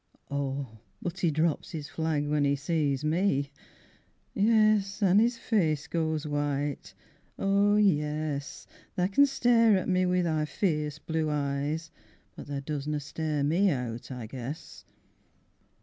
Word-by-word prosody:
Oh 135 -5 -3 0.2
but 175 +2 -5
he 175 - +2
drops 155 +1 0
his 150 -3 -6
flag 155 -2 -1
when 150 0 +1
'e 140 0 +2
sees 145 -1 -1
me, 155 -4 +1 0.8
Yes, 215 -1 +3
an' 195 +1 +5
'is 235 +2 +2
face 160 -11 0
goes 160 -2 -1
white... 145 -7 -2 0.4
oh 200 +1 +3
yes 150 -7 0 0.3
Tha 180 +1 +1
can 280 +8 +5
stare 230 -5 +4
at 185 - -2
me 185 -1 +2
wi' 180 0 +2
thy 155 -2 0
fierce 150 -2 -1
blue 160 0 -2
eyes, 150 +2 -2 0.4
But - - -9
tha 140 -1 -4
doesna 150 0 -3
stare 150 0 -2
me 175 +7 +3
out, 125 -6 -3
I 125 -3 -6
guess! 130 +6 -8
155 Hz, 135 wpm, -28 LUFS, 145-185 Hz, 0.8 s, an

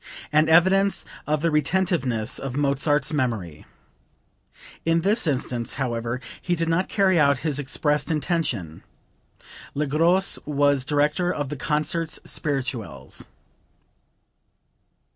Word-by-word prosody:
An 155 +1 +4
evidence 190 +4 +4 0.2
of 150 +1 0
the 165 - +2
retentiveness 145 - 0
of 135 -2 -5
Mozart's 145 +1 +1
memory. 110 - -2 1.2
In 165 0 +2
this 200 +1 +1
instance, 125 -4 -1
however, 120 -2 -2 0.2
he 175 - 0
did 165 0 -1
not 165 +3 +1
carry 190 -4 +3
out 140 -2 +4
his 150 -3 0
expressed 145 +2 0
intention. 145 - -2 0.9
Le 150 +2 0
Gros 170 +7 +2
was 145 -2 +2
director 150 +5 +1
of 145 -5 -3
the 150 - -4
Concerts 155 +3 -1
spirituels.) 125 - -4
150 Hz, 110 wpm, -24 LUFS, 130-165 Hz, 1.2 s, An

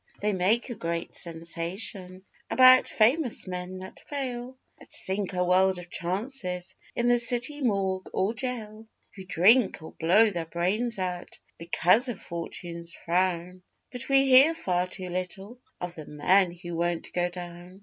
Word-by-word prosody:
They 210 0 0
make 205 +7 +1
a - - -2
great 170 -5 -4
sensation 180 +3 -5 0.2
About 255 0 +7
famous 245 +4 +2
men 180 0 -5
that 190 0 -10
fail, 260 -3 -5 0.2
That - - -16
sink 195 0 -2
a 180 0 +1
world 185 +1 +3
of 175 0 -10
chances 185 -1 -3 0.2
In 240 - +1
the 245 0 +4
city 245 +5 -1
morgue 195 -5 0
or 195 +4 0
gaol, 225 -3 -5 0.3
Who 190 -2 -9
drink, 200 +1 +4
or 160 - -9
blow 205 +7 +4
their 170 -3 -4
brains 200 +8 -1
out, 180 -2 -4 0.2
Because 180 +8 +3
of 230 - -5
'Fortune's 170 0 -6
frown.' 180 +1 -1 0.3
But 250 +1 -7
we 275 0 +5
hear 270 +5 +7
far 180 - 0
too 185 0 -7
little 190 +6 -5 0.2
Of 180 -1 -5
the 155 -3 -10
men 180 +5 +3
who 175 -1 -7
won't 170 0 -2
go 175 0 +1
down. 175 +1 -10
185 Hz, 155 wpm, -27 LUFS, 175-230 Hz, 0.3 s, About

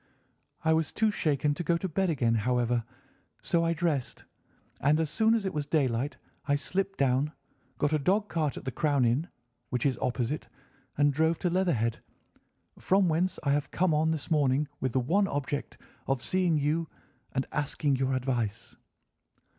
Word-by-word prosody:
I 160 - +5
was 160 -1 +1
too 220 -1 +2
shaken 150 -5 +1
to 175 - -4
go 170 +1 +2
to 190 - -3
bed 185 +2 0
again, 120 -7 +1
however, 120 +1 +1 0.6
so 170 -1 +2
I 165 0 +2
dressed, 160 -6 -2 0.6
and 150 +3 +3
as 160 -2 -1
soon 225 0 +3
as 220 -3 -1
it 190 - -2
was 150 -2 -2
daylight 140 -3 0 0.3
I 145 - +3
slipped 195 +7 -2
down, 140 +3 +1 0.4
got 145 +3 +1
a 155 - +3
dog 195 +8 +1
cart 155 -7 -1
at - - -8
the 130 - -2
Crown 145 -1 +2
Inn, 130 +8 +1 0.4
which 125 0 -1
is 130 -4 +1
opposite, 125 +3 -1 0.5
and 145 0 +4
drove 160 +3 +2
to 175 - -1
Leatherhead, 155 - +1 0.8
from 190 -1 +3
whence 170 +3 +1
I 140 - +2
have 145 0 0
come 180 -2 +1
on 155 +1 +2
this 160 +1 -3
morning 145 -1 +2
with 130 -2 -2
the 130 - +3
one 195 +11 +2
object 145 -1 -3 0.3
of 135 -2 0
seeing 180 -4 +2
you 150 +3 0 0.4
and 130 - 0
asking 145 -1 0
your 130 0 0
advice." 125 -5 -2
150 Hz, 175 wpm, -29 LUFS, 130-170 Hz, 0.8 s, I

